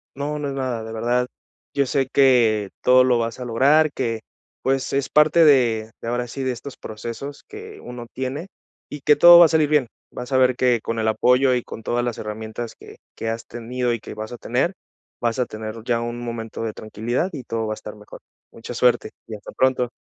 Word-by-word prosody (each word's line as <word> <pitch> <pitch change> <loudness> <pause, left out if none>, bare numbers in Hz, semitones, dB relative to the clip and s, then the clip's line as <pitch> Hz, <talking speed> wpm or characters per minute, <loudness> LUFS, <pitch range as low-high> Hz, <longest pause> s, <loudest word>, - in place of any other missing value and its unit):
No, 145 +2 -3
no 145 -1 -3
es - - -4
nada 130 -4 -3
de 110 - -7
verdad. 120 +2 0 0.5
Yo 140 -1 +2
sé 135 0 0
que 115 -7 +4
todo 130 0 +5
lo 125 -2 +3
vas 115 +1 -3
a 125 - -5
lograr, 140 +6 +3
que 115 -3 -2 0.4
pues, 135 0 0
es 135 -1 0
parte 155 +2 +5
de 115 -6 +3
de - - -7
ahora 120 0 -2
sí, 135 +3 -5
de 130 - 0
estos 125 +3 -8
procesos 120 +6 -7
que 425 0 -10
uno 120 -1 -9
tiene, 135 +7 -4 0.4
y 145 - -7
que 150 +2 +5
todo 175 +2 +9
va 175 - +10
a - - +5
salir 155 -2 +2
bien. 150 -5 +3 0.2
Vas 125 +2 -7
a - - +4
ver 130 -1 +3
que 125 -3 +2
con 115 0 -3
el 110 - 0
apoyo 125 +4 +3
y 125 - -1
con - - -9
todas 120 +2 -1
las 120 -2 -3
herramientas 110 +2 -6
que, - - -14 0.2
que 115 - -4
has 115 +1 -5
tenido 120 +1 -2
y 115 - -4
que - - -9
vas 110 +2 -7
a - - -7
tener, 135 +10 -1 0.5
vas 120 +1 0
a 125 - +2
tener 110 +1 -7
ya 120 -1 0
un 120 0 -4
momento 115 -2 -6
de 110 -2 -3
tranquilidad 115 - -3
y 145 -7 -7
todo 115 -1 -3
va 110 - -2
a - - -6
estar 105 0 -9
mejor. 105 0 -13 0.3
Mucha 115 +1 -9
suerte 120 -2 +2 0.2
y 110 - -6
hasta 105 - -11
pronto. 130 -2 +1
125 Hz, 225 wpm, -22 LUFS, 115-135 Hz, 0.5 s, va